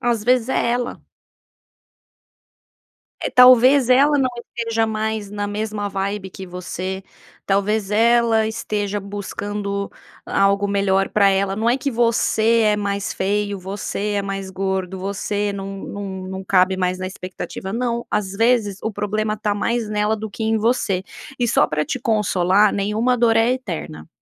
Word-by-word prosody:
Às 235 -4 0
vezes 250 0 +3
é 235 - +1
ela. 245 0 -3 2.2
É, - - -2
talvez 255 +1 +7
ela 280 +3 +5
não 260 -1 +2 0.3
esteja 230 -1 0
mais 220 -1 -3
na 205 0 -3
mesma 210 0 -3
vibe 195 0 -3
que 190 - -9
você, 185 +1 -5 0.4
talvez 200 +1 0
ela 230 0 +3
esteja 210 -2 -2
buscando 200 0 -4 0.4
algo 200 +1 +2
melhor 195 -1 +1
pra 200 -2 +4
ela. 195 0 +1
Não 220 +3 0
é 245 - +2
que 275 +1 -2
você 230 -1 +2
é 210 -1 +3
mais 200 -1 -2
feio, 200 +1 -1
você 200 +2 -4
é 200 - 0
mais 195 -1 -4
gordo, 190 -1 -2
você 200 +2 -2
não 195 0 -6
não 195 -2 -6
não 190 0 -6
cabe 190 0 +3
mais 185 0 -1
na 185 - -4
expectativa, 185 +1 -7
não, 235 0 -1
às 205 -2 -1
vezes, 220 -2 +1
o 220 - -1
problema 215 +1 -2
tá 210 -1 -1
mais 230 +1 -1
nela 210 +1 0
do 215 0 -6
que 220 - -7
em 220 0 +1
você 215 -4 +1 0.4
e 245 - +1
só - - +3
para 150 0 -1
te 260 - -3
consolar 205 -3 +2
nenhuma 215 +5 +1
dor 230 -1 +3
é 225 +2 +4
eterna. 170 - -6
205 Hz, 155 wpm, -21 LUFS, 195-225 Hz, 2.2 s, talvez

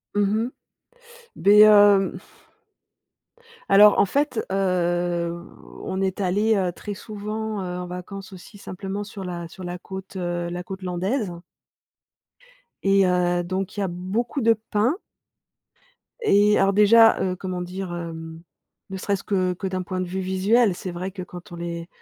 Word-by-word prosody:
Mmh 205 +2 +2
mh. 245 - -4 0.8
Beh 205 +2 +5
hem 205 -2 +5 1.5
Alors, 205 +1 +7
en - - +5
fait, 280 +3 0
hem, 175 -2 -1 0.4
on 190 0 -3
est 190 0 -1
allé, 205 +4 +2
heu, 185 -3 0
très 205 +4 -7
souvent, 215 0 -5
heu, 180 -1 -4
en 180 - -5
vacances 190 +2 -8
aussi, 190 +3 -13
simplement, 195 +1 -6
sur 200 -1 -8
la 175 -2 -5
sur 185 - -11
la 175 0 -5
côte, 190 +1 -9
heu, 175 -1 -3
la 175 +1 -5
côte 190 +1 -8
Landaise 185 +4 -2 1.5
et 195 0 +4
heu, 175 -1 +1
donc, 190 +3 -4
il - - -1
y - - +1
a - - 0
beaucoup 195 +10 -3
de 230 0 +5 0.2
pins 225 +9 +2 1.2
et 210 - +4
alors 195 0 +3
déjà, 225 +2 +6
heu, 185 -1 0
comment 185 -1 -5
dire, 180 0 -5
hem? 165 -1 -7 0.5
Ne 190 - -5
serait-ce 200 +1 -2
que 185 -2 0
que 190 +2 -5
d'un 185 -1 -3
point 185 0 -3
de - - -2
vue 190 +2 -4
visuel, 190 +3 +2
c'est 185 - -6
vrai 180 +2 -5
que 190 -1 -7
quand 180 0 -11
on 170 - -8
est 170 0 -5
190 Hz, 160 wpm, -23 LUFS, 180-205 Hz, 1.5 s, Alors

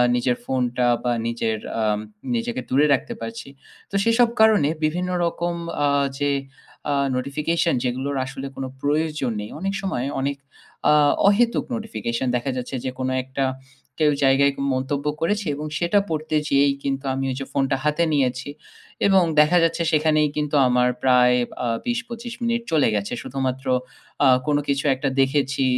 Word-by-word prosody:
নিজের 125 0 +1
ফোনটা 125 -1 0 0.2
বা 120 - +1 0.2
নিজের 115 -1 -1 0.2
আ - - +1 0.5
নিজেকে 120 +2 -2
দূরে 140 +3 +4
রাখতে 185 - -1
পারছি। 230 -7 -6 0.4
তো - - -7
সেসব 230 +1 +4
কারণে 215 -10 +5
বিভিন্ন 180 +4 0 0.2
রকম 170 +1 -2 0.3
আ - - +3 0.3
যে 145 0 +1 0.6
আ - - +2 0.2
notification 155 +6 0
যেগুলোর 130 +3 -2
আসলে 135 +1 -6
কোনো 135 -1 -4
প্রয়োজন 150 -3 0
নেই। 105 - -7
অনেক 195 +2 -2
সময় 135 -10 -2 0.2
অনেক 140 +1 -1 0.5
আ - - +6 0.3
অহেতুক 235 +4 +3
নোটিফিকেশন 130 - -3
দেখা 125 +3 -1
যাচ্ছে 125 +2 -4
যে 130 - -1
কোনো 130 0 -1
একটা 130 +1 -3 0.6
কেউ 150 -1 +4
জায়গায় 135 +1 +4 0.2
মন্তব্য 140 +2 -2 0.2
করেছে 205 +4 0
এবং 150 +1 -5
সেটা 175 +4 +2
পড়তে 155 0 -2
যেয়েই 140 0 +4
কিন্তু 135 0 -2
আমি 135 +1 -2
ওই - - -3
যে 135 - -4
ফোনটা 135 -1 +1
হাতে 150 +3 +1
নিয়েছি 130 -1 0 0.6
এবং 190 -2 +5 0.2
দেখা 150 +4 +5
যাচ্ছে 165 0 +1
সেখানেই 155 -1 +3
কিন্তু 150 0 -1
আমার 125 0 +3
প্রায় 125 -1 +5 0.3
আ - - 0 0.2
২০-২৫ 240 -1 -4
মিনিট 235 0 0
চলে 155 -2 +4
গেছে 100 -1 -2
শুধুমাত্র 130 0 -3 0.6
আ - - +7 0.2
কোন 150 -1 +3
কিছু 140 0 0
একটা 135 +1 -1
দেখেছি, 135 0 +1
140 Hz, 155 wpm, -23 LUFS, 130-165 Hz, 0.6 s, আ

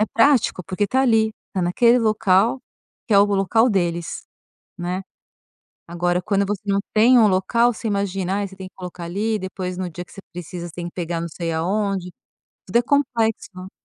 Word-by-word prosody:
é - - +4
prático, 230 -6 +3
porque 200 +2 -1
tá 260 +6 +1
ali, 225 -4 +3 0.2
tá 185 - -1
naquele 235 +8 +4
local, 215 +1 +2 0.5
que 215 - +1
é - - +7
o 200 - +7
local 205 +4 +2
deles, 175 -3 -2 0.5
né. 180 +1 -3 0.9
Agora 175 +1 0
quando 200 -1 +1
você 205 -1 -3
não 200 -1 +1
tem 235 +4 +6
um 220 - +6
local, 205 +5 +2
você 225 - -5
imagina, 195 -2 -1
ai, 205 - -2
você 190 - -14
tem 190 -1 -8
que - - -20
colocar 180 -1 -8
ali, 210 +5 -1
depois 185 -1 -5
no 185 -1 -3
dia 175 +2 -7
que - - -21
você 195 - -11
precisa, 175 0 -6
você 165 - -12
tem 175 - -6
que - - -10
pegar 170 -1 -3
não 170 - -3
sei 165 +1 -4
aonde. 185 +2 -1 0.5
Tudo 190 - +1
é 240 - +4
complexo. 225 -8 -1
195 Hz, 195 wpm, -22 LUFS, 180-220 Hz, 0.9 s, é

